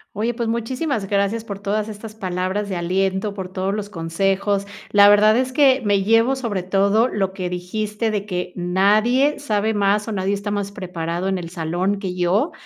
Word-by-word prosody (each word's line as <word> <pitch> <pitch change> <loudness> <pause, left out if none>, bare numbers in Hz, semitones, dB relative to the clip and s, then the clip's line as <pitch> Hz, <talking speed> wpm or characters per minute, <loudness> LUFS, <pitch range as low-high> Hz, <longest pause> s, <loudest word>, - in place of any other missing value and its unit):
Oye, 230 +3 -1
pues 235 -2 -2
muchísimas 235 0 -2
gracias 200 +2 0
por 200 -3 -6
todas 205 +2 -2
estas 215 +1 -8
palabras 190 0 -3
de 190 - -2
aliento, 190 +3 -1
por 190 -2 -6
todos 190 +1 -2
los 210 -1 -4
consejos. 195 +3 -1 0.2
La 205 0 +7
verdad 210 +1 +6
es 255 +1 0
que, 270 -1 +4
me 200 -2 +2
llevo 225 +5 +3
sobre 225 -8 -2
todo 200 +5 +2
lo 195 -6 -2
que 185 -2 -4
dijiste 210 +5 -3
de 205 -1 -3
que 180 -2 -3
nadie 210 +10 +2
sabe 220 -4 0
más 205 +1 +1
o 225 - -3
nadie 195 0 0
está 205 +1 -4
más 200 -1 -2
preparado 175 -2 -4
en 190 -1 -1
el 170 -1 -7
salón 175 +4 -1
que 190 -2 -4
yo, 185 - +1
200 Hz, 190 wpm, -21 LUFS, 185-215 Hz, 0.2 s, La